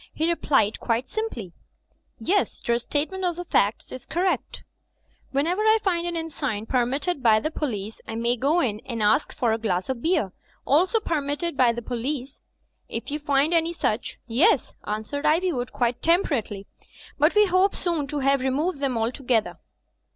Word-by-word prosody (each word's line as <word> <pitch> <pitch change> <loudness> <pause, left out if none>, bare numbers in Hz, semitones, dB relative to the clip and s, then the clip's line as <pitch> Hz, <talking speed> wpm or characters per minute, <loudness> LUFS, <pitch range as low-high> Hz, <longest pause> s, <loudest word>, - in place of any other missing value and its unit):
He 320 - 0
replied 280 -10 +2
quite 235 +2 -1
simply, 245 - -4 0.6
"Yes, 400 +3 0
Your 235 0 +3
statement 305 +9 -2
of 350 -2 0
the 355 +1 -6
facts 205 -8 +1
is 255 - -9
correct." 360 +3 -1 0.7
"Whenever 330 +9 +1
I 435 +1 +5
find 345 -3 0
an 345 - -3
inn 325 -1 -3
sign 220 -9 -3
permitted 270 +7 0
by 220 -3 +5
the 310 - -3
po 300 - -2
lice, 215 -2 -6
I 225 - -5
may 235 +1 +1
go 290 +8 +2
in 215 -8 -1
and 230 -4 -2
ask 210 +8 +3
for 235 -3 0
a 225 - -1
glass 190 -3 -1
of 255 -3 -2
beer 320 - +1 0.2
— - - -36
^also 370 - +3
per 320 -3 0
mitted 290 +4 -3
by 255 -3 +4
the 235 0 -5
police." 255 +3 -4 0.5
"If - - -4
you 300 - -2
find 290 +2 +2
any 335 0 +2
such, 230 -8 -2
yes," 280 - +2
answered 220 +8 -3
Ivywood, 310 -6 +1
quite 240 -1 -1
temperately. 275 - +1 0.5
"But 300 +6 +4
we 420 0 +6
hope 370 +1 +3
soon 335 -5 -1
to 295 +1 -3
have 275 +1 +3
re 265 +1 0
moved 295 +4 -1
them 270 -4 0
altogether." 235 0 0
280 Hz, 180 wpm, -25 LUFS, 235-340 Hz, 0.7 s, we